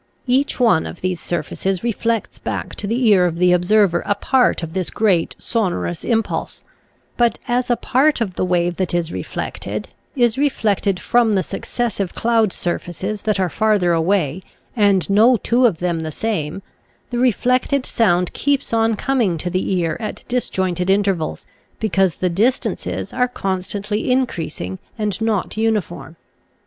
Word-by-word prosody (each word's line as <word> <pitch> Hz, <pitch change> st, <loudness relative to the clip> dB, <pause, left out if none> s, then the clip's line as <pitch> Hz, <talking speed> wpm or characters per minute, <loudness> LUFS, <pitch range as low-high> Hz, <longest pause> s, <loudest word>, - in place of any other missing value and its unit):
Each 265 Hz, +3 st, +1 dB
one 225 Hz, -10 st, +3 dB
of -, -, -9 dB
these 185 Hz, -2 st, -1 dB
surfaces 190 Hz, +2 st, -2 dB
reflects 230 Hz, -1 st, -1 dB
back -, -, -4 dB
to 205 Hz, -, -4 dB
the 235 Hz, +3 st, +1 dB
ear 185 Hz, -3 st, +5 dB
of 165 Hz, -, -3 dB
the 180 Hz, +1 st, +4 dB
observer 180 Hz, 0 st, +3 dB
a 205 Hz, -, +2 dB
part 250 Hz, -3 st, +2 dB
of 160 Hz, -1 st, -5 dB
this 185 Hz, -2 st, -2 dB
great 190 Hz, -7 st, +1 dB
sonorous 180 Hz, -6 st, -2 dB
impulse; 225 Hz, -2 st, -2 dB, 0.5 s
but 235 Hz, -2 st, +2 dB
as 245 Hz, +1 st, 0 dB
a 240 Hz, -, +4 dB
part 275 Hz, +5 st, +2 dB
of 210 Hz, -6 st, -2 dB
the -, -, -2 dB
wave 175 Hz, -1 st, +1 dB
that 185 Hz, -2 st, -1 dB
is 170 Hz, -1 st, -1 dB
reflected, -, -, -5 dB, 0.3 s
is 240 Hz, -1 st, +2 dB
reflected 205 Hz, -9 st, +1 dB
from 235 Hz, -2 st, +2 dB
the 190 Hz, -2 st, +2 dB
successive 205 Hz, -1 st, -3 dB
cloud 225 Hz, -3 st, +2 dB
surfaces 185 Hz, +4 st, -3 dB
that 215 Hz, -3 st, 0 dB
are 185 Hz, -, +2 dB
farther 200 Hz, -2 st, +2 dB
away, 165 Hz, -1 st, +1 dB, 0.3 s
and 200 Hz, -5 st, +3 dB
no 225 Hz, +5 st, +5 dB
two 245 Hz, +3 st, +3 dB
of 180 Hz, -, -1 dB
them 175 Hz, -1 st, -1 dB
the 160 Hz, -1 st, -4 dB
same, 175 Hz, -1 st, -3 dB, 0.5 s
the 240 Hz, -, -1 dB
reflected 255 Hz, +2 st, +2 dB
sound 180 Hz, -6 st, +1 dB
keeps 280 Hz, -3 st, -1 dB
on 225 Hz, 0 st, +2 dB
coming 230 Hz, -8 st, 0 dB
to 175 Hz, +3 st, -4 dB
the 185 Hz, +2 st, -1 dB
ear 165 Hz, -3 st, 0 dB
at 215 Hz, -, -5 dB
disjointed 185 Hz, -7 st, -1 dB
intervals, 195 Hz, -5 st, 0 dB, 0.3 s
because 190 Hz, -5 st, +1 dB
the 185 Hz, -, -1 dB
dis 215 Hz, +9 st, +2 dB
tances -, -, -4 dB
are 250 Hz, -, +2 dB
constantly 205 Hz, 0 st, -2 dB
increasing 165 Hz, -, -2 dB, 0.2 s
and 210 Hz, -2 st, -2 dB
not 215 Hz, -2 st, -1 dB
uni 220 Hz, -1 st, +2 dB
form. 170 Hz, -2 st, -10 dB
200 Hz, 160 wpm, -20 LUFS, 180-230 Hz, 0.5 s, ear